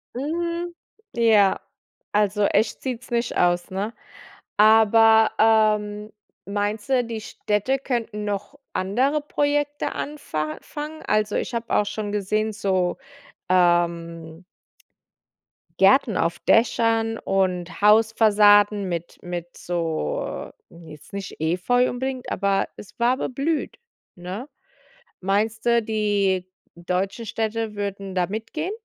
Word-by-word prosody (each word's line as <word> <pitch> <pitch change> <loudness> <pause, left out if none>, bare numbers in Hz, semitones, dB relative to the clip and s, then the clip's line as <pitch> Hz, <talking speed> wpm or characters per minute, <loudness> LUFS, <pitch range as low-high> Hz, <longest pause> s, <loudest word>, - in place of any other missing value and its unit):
Hm, 340 +5 -3 0.4
ja. 220 -5 +4 0.5
Also 210 0 +2
echt 215 +2 +1
sieht's 250 -2 -5
nicht 235 0 -1
aus, 175 0 +2
ne? 200 +4 -3 0.6
Aber, 220 +1 +6
ähm, 215 -1 +2 0.3
meinst 205 +1 -2
du, 255 -2 +3
die 230 -1 -5
Städte 210 +6 -1
könnten 235 -5 -3
noch 205 +6 -4 0.2
andere 255 +11 +1
Projekte 290 0 -1
anfa 155 - -4
fangen? 305 +1 -7
Also, 215 0 +1
ich - - -3
habe 230 0 -2
auch 210 - +3
schon 205 0 -4
gesehen, 215 +2 -1
so, 190 -3 0 0.5
ähm 170 -2 +1 1.4
Gärten 210 +3 +5
auf 170 -1 0
Dächern 225 0 +2
und 185 -1 -1
Hausfassaden 210 -1 +5
mit 170 -1 -5
mit 175 -1 -6
so, 165 - -3 0.2
jetzt 160 -3 -14
nicht 200 -1 -6
Efeu 185 +10 +2
unbedingt, 260 0 -4
aber 200 0 0
es 205 - -13
war 240 +2 +2
beblüht, 285 - -2 0.4
ne? 185 +8 -7 0.7
Meinst 210 +4 -1
du, 235 0 +4
die 205 -4 0 0.3
deutschen 185 +6 -3
Städte 220 0 -3
würden 200 -1 -5
da 180 -1 +2
mitgehen? 225 - -4
210 Hz, 110 wpm, -23 LUFS, 190-235 Hz, 1.4 s, Aber